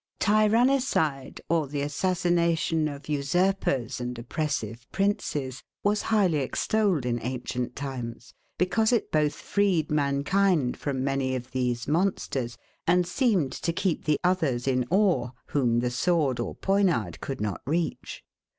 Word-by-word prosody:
Tyrannicide, 215 Hz, -, +2 dB
or 165 Hz, -3 st, +1 dB
the 140 Hz, +1 st, -3 dB
assassination 170 Hz, 0 st, +1 dB
of 145 Hz, -1 st, -7 dB
usurpers 145 Hz, -, 0 dB
and 125 Hz, 0 st, -4 dB
oppressive 120 Hz, -3 st, -3 dB
princes, 150 Hz, -, -1 dB, 0.2 s
was 210 Hz, +1 st, +2 dB
highly 195 Hz, -8 st, +3 dB
extolled 185 Hz, -, 0 dB
in 120 Hz, -1 st, -1 dB
ancient 125 Hz, 0 st, -3 dB
times; 125 Hz, -3 st, -6 dB, 0.2 s
because 220 Hz, +5 st, +2 dB
it 235 Hz, -, +1 dB
both 150 Hz, -1 st, +2 dB
freed 195 Hz, -7 st, 0 dB
mankind 150 Hz, +1 st, +2 dB
from 135 Hz, -3 st, -3 dB
many 135 Hz, -1 st, 0 dB
of 125 Hz, 0 st, -6 dB
these 125 Hz, -2 st, -1 dB
monsters, 140 Hz, -7 st, -1 dB, 0.3 s
and 180 Hz, +1 st, +4 dB
seemed 185 Hz, -, +1 dB
to 170 Hz, -, -2 dB
keep 185 Hz, -1 st, -1 dB
the 150 Hz, -2 st, +2 dB
others 155 Hz, -9 st, +1 dB
in 125 Hz, -2 st, +1 dB
awe, 180 Hz, -, +2 dB, 0.2 s
whom 120 Hz, -4 st, +2 dB
the 125 Hz, 0 st, -1 dB
sword 140 Hz, -1 st, +1 dB
or 120 Hz, -, -3 dB
poniard 175 Hz, -, +1 dB
could 135 Hz, -, -4 dB
not 105 Hz, -2 st, -3 dB
reach. 165 Hz, +3 st, -2 dB
150 Hz, 130 wpm, -27 LUFS, 130-185 Hz, 0.3 s, and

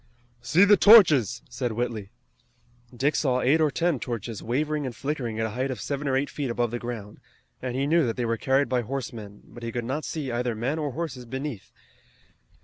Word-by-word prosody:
"See 180 Hz, +5 st, +4 dB
the 205 Hz, 0 st, +6 dB
torches!" 150 Hz, -, +6 dB
said 120 Hz, -1 st, -3 dB
Whitley. 110 Hz, -3 st, -3 dB, 0.8 s
Dick 135 Hz, +5 st, 0 dB
saw 130 Hz, -4 st, +1 dB
eight 150 Hz, +6 st, +3 dB
or 155 Hz, -, +4 dB
ten 165 Hz, -1 st, 0 dB
torches 115 Hz, -3 st, -5 dB
wavering 150 Hz, +5 st, -1 dB
and 120 Hz, -, -6 dB
flickering 120 Hz, -3 st, -3 dB
at 110 Hz, -, +1 dB
a 110 Hz, -, -3 dB
height 130 Hz, +4 st, -2 dB
of 130 Hz, -, -4 dB
seven 140 Hz, 0 st, -3 dB
or 130 Hz, -1 st, +2 dB
eight 140 Hz, +2 st, -1 dB
feet 140 Hz, -4 st, -3 dB
above 120 Hz, -1 st, -1 dB
the 120 Hz, -, -3 dB
ground, 115 Hz, -4 st, -7 dB, 0.4 s
and 125 Hz, -1 st, -4 dB
he 135 Hz, +1 st, 0 dB
knew 165 Hz, +3 st, +3 dB
that 115 Hz, -, -2 dB
they 125 Hz, -, -1 dB
were 115 Hz, 0 st, 0 dB
carried 135 Hz, +3 st, +1 dB
by 125 Hz, 0 st, +1 dB
horsemen, 115 Hz, -5 st, -6 dB
but 120 Hz, -, -13 dB
he 115 Hz, 0 st, -4 dB
could 120 Hz, 0 st, -3 dB
not 140 Hz, +6 st, -3 dB
see 145 Hz, -5 st, -4 dB
either 120 Hz, 0 st, -1 dB
men 130 Hz, +8 st, -2 dB
or 145 Hz, -4 st, -3 dB
horses 140 Hz, -5 st, -5 dB
beneath. 130 Hz, -3 st, -6 dB
125 Hz, 210 wpm, -26 LUFS, 120-145 Hz, 0.8 s, the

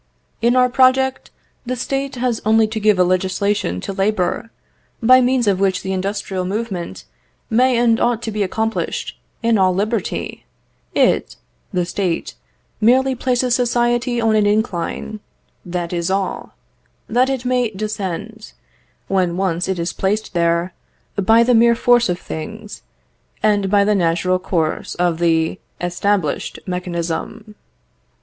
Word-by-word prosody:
"In 240 Hz, +2 st, +3 dB
our 250 Hz, 0 st, +5 dB
project, 260 Hz, +1 st, +2 dB, 0.3 s
the 255 Hz, +1 st, -3 dB
State 270 Hz, +2 st, -3 dB
has 245 Hz, -2 st, -1 dB
only 220 Hz, +1 st, +4 dB
to 220 Hz, +1 st, -4 dB
give 210 Hz, -2 st, +3 dB
a 180 Hz, -, +5 dB
legislation 185 Hz, -, 0 dB
to 195 Hz, -, -5 dB
labour, 195 Hz, +1 st, -1 dB, 0.5 s
by 255 Hz, +2 st, +6 dB
means 250 Hz, -1 st, +2 dB
of 195 Hz, -2 st, +2 dB
which 190 Hz, -1 st, +1 dB
the 190 Hz, -, -2 dB
industrial 190 Hz, 0 st, -2 dB
movement 195 Hz, -2 st, -4 dB, 0.5 s
may 250 Hz, +2 st, +3 dB
and 235 Hz, -1 st, +3 dB
ought 235 Hz, -1 st, +1 dB
to 225 Hz, -, -3 dB
be 210 Hz, 0 st, -3 dB
accomplished 220 Hz, +3 st, -2 dB, 0.2 s
in 230 Hz, -2 st, +3 dB
all 185 Hz, -1 st, +3 dB
liberty. 210 Hz, +1 st, -2 dB, 0.5 s
It -, -, +2 dB, 0.4 s
(the 180 Hz, -3 st, 0 dB
State) 180 Hz, -2 st, -2 dB, 0.5 s
merely 260 Hz, +4 st, +4 dB
places 250 Hz, 0 st, 0 dB
society 240 Hz, 0 st, +1 dB
on 225 Hz, -1 st, +2 dB
an 210 Hz, -1 st, +3 dB
incline 210 Hz, 0 st, -1 dB, 0.4 s
(that 175 Hz, -1 st, -4 dB
is 170 Hz, 0 st, -1 dB
all) 195 Hz, 0 st, -2 dB, 0.5 s
that 250 Hz, +3 st, +2 dB
it 260 Hz, -2 st, -2 dB
may 250 Hz, -2 st, +1 dB
descend, 215 Hz, +1 st, -5 dB, 0.5 s
when 180 Hz, -3 st, 0 dB
once 180 Hz, -2 st, 0 dB
it 190 Hz, -1 st, -1 dB
is 170 Hz, 0 st, -2 dB
placed 210 Hz, +3 st, -1 dB
there, 170 Hz, +1 st, +1 dB, 0.4 s
by 225 Hz, +4 st, +4 dB
the 245 Hz, +1 st, +3 dB
mere 235 Hz, 0 st, +5 dB
force 240 Hz, -1 st, +3 dB
of 175 Hz, -, 0 dB
things, 210 Hz, +7 st, -8 dB, 0.6 s
and 205 Hz, -2 st, +2 dB
by 200 Hz, 0 st, +4 dB
the 210 Hz, +1 st, +2 dB
natural 180 Hz, 0 st, +1 dB
course 165 Hz, -4 st, -2 dB
of 175 Hz, -2 st, 0 dB
the 165 Hz, 0 st, +1 dB, 0.2 s
established 175 Hz, -2 st, -1 dB
mechanism." 180 Hz, +4 st, -4 dB
210 Hz, 140 wpm, -19 LUFS, 185-235 Hz, 0.6 s, by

